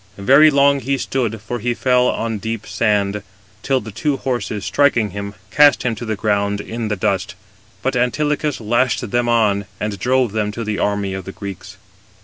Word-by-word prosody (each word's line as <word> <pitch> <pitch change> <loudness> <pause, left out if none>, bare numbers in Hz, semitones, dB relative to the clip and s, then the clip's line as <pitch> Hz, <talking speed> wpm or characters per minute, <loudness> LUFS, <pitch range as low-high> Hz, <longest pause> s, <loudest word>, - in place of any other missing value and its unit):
Very 135 +10 +6
long 140 -1 +4
he 135 +2 -1
stood 120 -5 -2
(for 120 +3 -5
he 120 +2 -1
fell 125 0 +2
on 115 -2 -2
deep 110 +1 -4
sand), 105 -2 0 0.4
till 135 -1 +1
the 110 -2 -9
two 135 +7 -1
horses, 120 -7 -3
striking 120 -8 +2
him, 100 +1 -6 0.2
cast 145 +4 +5
him 125 -2 0
to 115 +2 -6
the 110 -1 -2
ground 100 -1 0
in 115 +2 -4
the 105 - -1
dust: 95 -1 -1 0.5
but 130 0 0
Antilochus 145 +3 0
lashed 120 -1 0
them 120 0 +1
on, 105 -4 +2
and 105 -2 -3
drove 125 0 +1
them 105 -1 -1
to 115 - -4
the 105 -2 -3
army 100 -1 -1
of 95 -1 -6
the 95 - -6
Greeks. 100 -2 -8
115 Hz, 185 wpm, -19 LUFS, 100-130 Hz, 0.5 s, Very